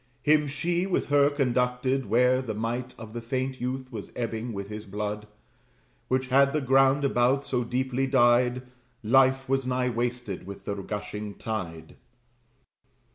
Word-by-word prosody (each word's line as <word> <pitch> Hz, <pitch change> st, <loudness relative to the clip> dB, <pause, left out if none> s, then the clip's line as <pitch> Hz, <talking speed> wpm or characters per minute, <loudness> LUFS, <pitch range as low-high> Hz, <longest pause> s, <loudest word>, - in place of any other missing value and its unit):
Him 150 Hz, 0 st, +4 dB
she 170 Hz, +6 st, -1 dB
with 185 Hz, -, -1 dB
her 145 Hz, 0 st, +5 dB
conducted, 130 Hz, -2 st, 0 dB
where 125 Hz, +4 st, +3 dB
the 110 Hz, -5 st, -4 dB
might 120 Hz, +3 st, -3 dB
Of 110 Hz, -1 st, -10 dB
the 120 Hz, -, -5 dB
faint 130 Hz, +2 st, -3 dB
youth 130 Hz, +1 st, -3 dB
was 110 Hz, -4 st, -7 dB
ebbing 115 Hz, 0 st, -3 dB
with 100 Hz, -2 st, -5 dB
his 105 Hz, 0 st, -7 dB
blood: 105 Hz, +1 st, -4 dB, 0.8 s
Which 130 Hz, 0 st, 0 dB
had 140 Hz, +1 st, +4 dB
the 155 Hz, -, +2 dB
ground 135 Hz, +1 st, +3 dB
about 135 Hz, +1 st, +2 dB
so 125 Hz, -2 st, 0 dB
deeply 130 Hz, +2 st, -1 dB
dyed 125 Hz, -1 st, +3 dB, 0.4 s
Life 135 Hz, +3 st, +4 dB
was 135 Hz, -1 st, 0 dB
nigh 125 Hz, 0 st, 0 dB
wasted 120 Hz, -5 st, -3 dB
with 100 Hz, -, -9 dB
the 100 Hz, -, -2 dB
gushing 105 Hz, +1 st, -5 dB
tide. 85 Hz, -8 st, -6 dB
125 Hz, 150 wpm, -27 LUFS, 110-135 Hz, 0.8 s, her